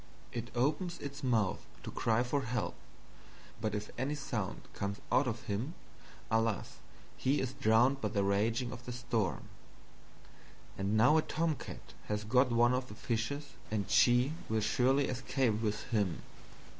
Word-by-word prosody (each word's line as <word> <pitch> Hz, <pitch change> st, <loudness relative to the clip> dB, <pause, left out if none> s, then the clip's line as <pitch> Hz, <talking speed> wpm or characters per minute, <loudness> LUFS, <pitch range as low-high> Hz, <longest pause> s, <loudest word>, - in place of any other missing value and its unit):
It 120 Hz, 0 st, -4 dB
opens 155 Hz, +8 st, +1 dB
its 140 Hz, -1 st, -7 dB
Mouth 115 Hz, -6 st, +1 dB, 0.2 s
to -, -, -5 dB
cry 115 Hz, +1 st, +2 dB
for 130 Hz, +3 st, 0 dB
Help; 125 Hz, -1 st, -2 dB, 0.9 s
but 110 Hz, -1 st, -1 dB
if 105 Hz, 0 st, -4 dB
any 140 Hz, +3 st, 0 dB
Sound 120 Hz, -9 st, -3 dB
comes 100 Hz, 0 st, -3 dB
out 130 Hz, -, +4 dB
of 115 Hz, -1 st, -3 dB
him, 115 Hz, -, -3 dB, 0.6 s
alas 115 Hz, -3 st, 0 dB, 0.4 s
he 140 Hz, +3 st, +2 dB
is 130 Hz, 0 st, -2 dB
drowned 120 Hz, +5 st, +3 dB
by -, -, +1 dB
the 100 Hz, -3 st, +1 dB
raging 110 Hz, +5 st, +1 dB
of 125 Hz, 0 st, -8 dB
the -, -, -3 dB
Storm. 115 Hz, -6 st, -1 dB, 1.3 s
And 100 Hz, +2 st, 0 dB
now 125 Hz, +8 st, +6 dB
a -, -, +5 dB
Tomcat 160 Hz, -2 st, -3 dB
has 105 Hz, 0 st, -1 dB
got 125 Hz, +4 st, +3 dB
one 120 Hz, +1 st, +4 dB
of 125 Hz, 0 st, -1 dB
the 105 Hz, -, -9 dB
Fishes 130 Hz, +4 st, -2 dB, 0.2 s
and 105 Hz, -3 st, -2 dB
she 125 Hz, +4 st, +5 dB, 0.2 s
will 110 Hz, 0 st, +1 dB
surely 130 Hz, +6 st, +3 dB
escape 130 Hz, -3 st, 0 dB
with 105 Hz, -2 st, -1 dB
him. 100 Hz, -6 st, 0 dB
120 Hz, 155 wpm, -33 LUFS, 110-135 Hz, 1.3 s, now